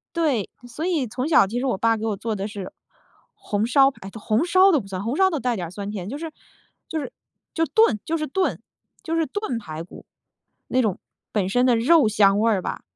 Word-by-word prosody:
对， 290 - 0 0.2
所 295 +8 -5
以 315 -9 0
从 255 +6 -3
小 310 - +5
其 235 +5 -3
实 260 - -2
我 250 -7 0
爸 230 +1 +2
给 220 - -4
我 210 -3 -1
做 220 0 -3
的 195 +1 -3
是 205 -3 -7 0.6
红 215 - -2
烧 270 +2 +5
排 195 -7 -11
都 225 - -10
红 220 +9 +1
烧 375 +2 +5
都 305 - +3
不 200 - -9
算， 190 0 -5
红 235 +4 -2
烧 380 +3 +4
都 315 -6 -2
带 250 -2 -1
点 175 -5 -4
儿 - - -12
酸 200 +1 -6
甜。 195 -2 -5
就 280 - -5
是 325 0 -6 0.6
就 320 - -3
是 280 - -6 0.4
就 325 - +1
炖 440 - +3
就 330 +1 -1
是 310 - -2
炖 375 +7 -1 0.4
就 330 -2 -2
是 325 -1 +1
炖 410 - -3
排 160 -6 -7
骨。 170 - -13 0.6
那 255 - +1
种 210 -6 -1 0.3
本 200 -4 0
身 245 +4 +3
的 245 -2 +4
肉 270 +2 +4
香 205 -1 +4
味 230 +1 +3
儿 200 -4 +1
吧， - - -5
240 Hz, 255 characters per minute, -23 LUFS, 205-315 Hz, 0.6 s, 小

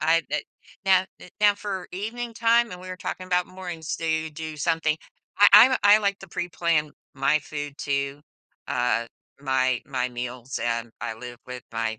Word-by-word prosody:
I 165 +2 +3
bet. 150 - -1 0.4
Now, 190 -1 +5 0.2
eh, - - -12
now 205 -1 +6
for 200 -2 -5
evening 230 +5 -4
time, 235 0 +3
and 180 - -8
we 185 - -9
were 185 - -5
talking 185 0 -5
about 180 -1 +1
mornings, 175 -4 -6
do 165 - -4
you 160 0 0
do 155 0 -7
something 160 0 +1 0.4
I 205 0 +9
I'm 225 +6 +10
a - - +2
I 205 +1 +8
like 200 -2 0
to 195 - -11
preplan 165 -3 0 0.2
my 135 +3 +3
food 145 0 -6
too, 140 0 -2 0.5
uh, 125 -3 +1 0.3
my 130 -2 +1
my 125 -2 -1
meals, 125 +1 -5
and 115 0 -1
I 120 -1 -3
live 120 +2 -9
with 125 -1 -7
my 115 -1 -2
160 Hz, 185 wpm, -25 LUFS, 130-185 Hz, 0.5 s, I'm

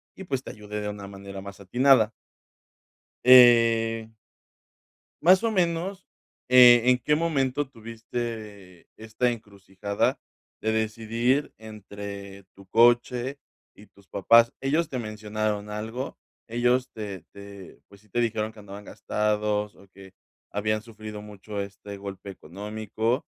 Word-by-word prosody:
y, 190 - -9
pues, 135 -6 -3
te - - -7
ayude 105 0 -7
de 105 - -4
una 100 -1 -7
manera 100 0 -9
más 100 +1 -10
atinada. 120 +2 +4 1.1
Eh 115 -3 +6 1.1
más 185 +6 +5
o 230 - +2
menos, 180 +1 -1 0.4
eh, 120 -2 +8
¿en 125 0 +4
qué 150 +5 +1
momento 145 -4 0
tuviste 110 -5 -7
esta 110 +3 -1
encrucijada 100 -2 -3 0.4
de 110 - 0
decidir 115 +5 0
entre 100 -2 -9
tu 100 -1 -17
coche 120 +4 +3 0.3
y 105 - -17
tus 100 -1 -24
papás? 115 +4 +4
Ellos 150 +4 0
te 130 - -3
mencionaron 105 -1 -3
algo, 115 +5 -5 0.3
ellos 125 +2 +1
te 100 -6 -7
te 100 -2 -12
pues, 100 0 -18
sí 105 - -27
te 120 +5 0
dijeron 110 -1 -1
que 110 - -15
andaban 100 0 -10
gastados, 105 0 -1
o 100 - -19
que 95 0 -15 0.4
habían 110 +1 -1
sufrido 110 -2 -9
mucho 105 0 -7
este 100 +1 -8
golpe 100 0 -8
económico, 110 - -3
110 Hz, 130 wpm, -26 LUFS, 100-120 Hz, 1.1 s, eh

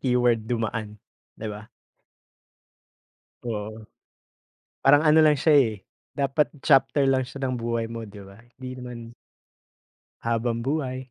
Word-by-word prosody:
keyword, 125 -3 +2
dumaan, 110 -2 -3 0.4
'di 110 - -5
ba? 105 +2 -10 1.7
Oo. 110 -1 -5 1.0
Parang 145 +3 +5
ano 155 +1 +5
lang 155 -1 +6
siya, 150 +3 +3
eh, 120 -5 +4 0.4
dapat 140 +1 +1 0.2
chapter 135 0 +4
lang 130 -1 +2
siya 135 +1 -8
ng 130 -1 -1
buhay 115 0 -1
mo, 115 -2 -6
'di 100 0 -11
ba? 100 +2 -15 0.2
Hindi 130 0 -8
naman 125 -1 -7 1.3
habambuhay, 125 +3 -2
125 Hz, 120 wpm, -25 LUFS, 115-135 Hz, 1.7 s, lang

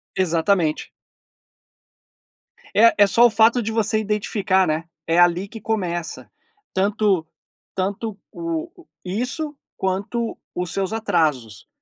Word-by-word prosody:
Exatamente. 170 -2 +1 1.9
É, 230 +2 +7
é 205 -1 +6
só 235 +4 +5
o - - +7
fato 230 +2 +4
de 225 0 -3
você 220 -1 +1
identificar, 200 -3 +1
né, 155 +2 -1 0.2
é 165 +1 +3
ali 175 +2 +4
que 225 +2 -10
começa, 175 -7 -3 0.4
tanto 200 -3 +1 0.5
tanto 200 +2 -2
o 335 +1 -5 0.2
isso 255 - -3 0.2
quanto 200 +5 -2 0.2
os 180 -2 -3
seus 195 0 -1
atrasos, 150 - -1
200 Hz, 110 wpm, -22 LUFS, 175-225 Hz, 1.9 s, É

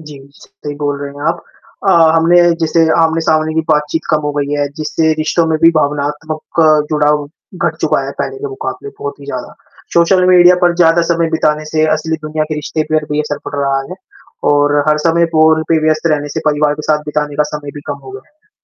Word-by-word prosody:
जी, 150 -3 -11 0.2
सही 145 -1 -9
बोल 145 -1 -2
रहे 140 0 -5
हैं 145 - -9
आप। - - -2 0.5
अ, - - +6 0.2
हमने 165 +2 +3 0.3
जैसे 165 0 +2 0.2
आमने-सामने 160 -1 +1
की 160 - +2
बातचीत 150 +1 0
कम 155 - +2
हो - - -3
गई 145 0 -2
है, 145 - 0
जिससे 160 +1 0
रिश्तों 165 +2 +1
में 160 -1 0
भी 165 - +7
भावनात्मक 150 +2 -2 0.3
जुड़ाव 150 -1 +1 0.4
घट - - -7
चुका - - +1
है - - -5
पहले - - -3
के 425 +1 -5
मुकाबले 410 +1 -6
बहुत 425 -1 -6
ही - - -11
ज़्यादा, - - -6 0.4
सोशल 180 +2 +3
मीडिया 180 0 +6
पर 175 -1 +3
ज़्यादा 170 -1 +4
समय 170 -1 0
बिताने 155 -1 0
से 155 0 +2
असली 160 +1 -3
दुनिया 155 0 -2
के - - -1
रिश्ते 150 +1 -3
पर 155 -1 +1
भी 150 - 0
असर 150 -1 -4
पड़ - - -7
रहा 140 -1 0
है - - -5 0.6
और 145 0 +2
हर 150 0 +3
समय 170 +1 +3
फ़ोन 160 0 +4
पे 165 - +3
व्यस्त 155 +1 +1
रहने 145 -1 -2
से - - 0
परिवार 150 0 +2
के 150 - -8
साथ 150 - +1
बिताने 150 -1 -2
का 150 - +3
समय 145 -1 -8
भी 145 - -8
कम 145 -1 -4
हो - - -8
गया 130 0 -9
है। 310 +8 -41
155 Hz, 215 wpm, -14 LUFS, 150-165 Hz, 0.6 s, भी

